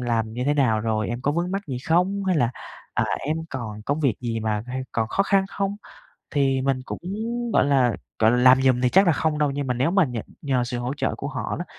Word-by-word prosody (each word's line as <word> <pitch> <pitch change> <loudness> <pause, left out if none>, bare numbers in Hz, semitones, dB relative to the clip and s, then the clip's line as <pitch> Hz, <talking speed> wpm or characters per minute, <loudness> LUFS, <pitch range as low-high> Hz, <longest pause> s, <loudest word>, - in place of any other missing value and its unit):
làm 115 -3 -1
như 125 +2 -3
thế 145 +2 +2
nào 115 -7 +2
rồi? 110 -1 -1
Em 120 +1 -3
có 145 +3 0
vướng 170 +3 -1
mắc 195 +1 -2
gì 135 -4 -4
không?", 190 +4 +2
hay 185 -2 +2
là, 120 -5 +2 0.4
à, - - +2 0.2
"em 155 +3 -1
còn 110 -5 -6
công 145 +7 -1
việc 135 -7 +2
gì 115 -2 -2
mà 110 -1 -1
hay 130 +1 -4
còn 110 -1 0
khó 195 - +2
khăn 195 -1 +2
không?" 200 0 -2 0.5
Thì 135 -3 +2
mình 135 -1 0
cũng - - -6 0.5
gọi - - +4
là, 130 -4 +3 0.3
gọi 110 0 +5
là, 120 - +2
làm 130 +1 +6
giùm 130 -2 +3
thì 125 - +3
chắc 190 +8 +5
là 170 - +5
không 155 0 0
đâu, 150 -1 +2
nhưng 140 0 -3
mà 125 - 0
nếu 130 +6 +1
mà 195 0 +4
nhờ 125 -5 -4 0.2
nhờ 130 -4 +1
sự 120 0 -4
hỗ 125 +3 -3
trợ 145 - -1
của 140 - -5
họ 130 -7 -3
đó, 175 - -3
130 Hz, 260 wpm, -24 LUFS, 120-155 Hz, 0.5 s, làm